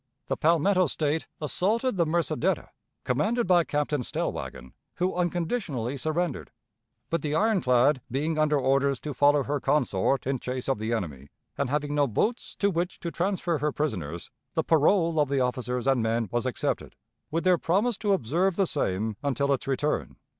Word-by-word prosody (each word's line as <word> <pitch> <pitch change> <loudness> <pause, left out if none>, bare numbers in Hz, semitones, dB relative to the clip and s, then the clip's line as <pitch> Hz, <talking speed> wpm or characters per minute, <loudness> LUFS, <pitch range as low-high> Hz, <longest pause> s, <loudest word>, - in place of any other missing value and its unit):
The - - +1
Palmetto 170 +3 +3
State 150 +2 -1
assaulted 210 - 0
the 170 -3 +2
Mercideta, 170 +1 0 0.3
commanded 210 - +1
by 175 -2 +4
Captain 150 -2 -1
Stellwagen, 65 - -4 0.2
who 185 +1 0
unconditionally 175 - -1
surrendered. 155 +2 -2 0.6
But 165 - +1
the 150 0 -1
ironclad 145 - +3
being 155 +5 -1
under 150 -1 +3
orders 135 0 +2
to 150 - -4
follow 145 +2 +4
her 145 +1 -1
consort 135 -3 +1
in 135 0 -1
chase 125 +1 -4
of 135 -5 0
the 110 +2 -2
enemy, 75 - -3 0.3
and 140 -2 -1
having 145 +1 -1
no 145 -1 +3
boats 220 - -1
to 200 0 +1
which 175 +1 -2
to 170 - -3
transfer 175 -3 -1
her 150 +2 0
prisoners, 90 - -3 0.2
the - - +2
parole 165 +1 +3
of 145 -2 +2
the 140 -1 +1
officers 125 -1 -1
and 135 -3 +3
men 115 -1 0
was 120 +2 0
accepted, 125 - -2 0.3
with 165 +2 -1
their 180 -2 +4
promise 205 +8 +1
to 205 -2 +2
observe 175 - +1
the 195 - +2
same 110 - -1
until 140 0 +1
its 135 - -3
return. 140 +2 -1
150 Hz, 170 wpm, -27 LUFS, 130-175 Hz, 0.6 s, by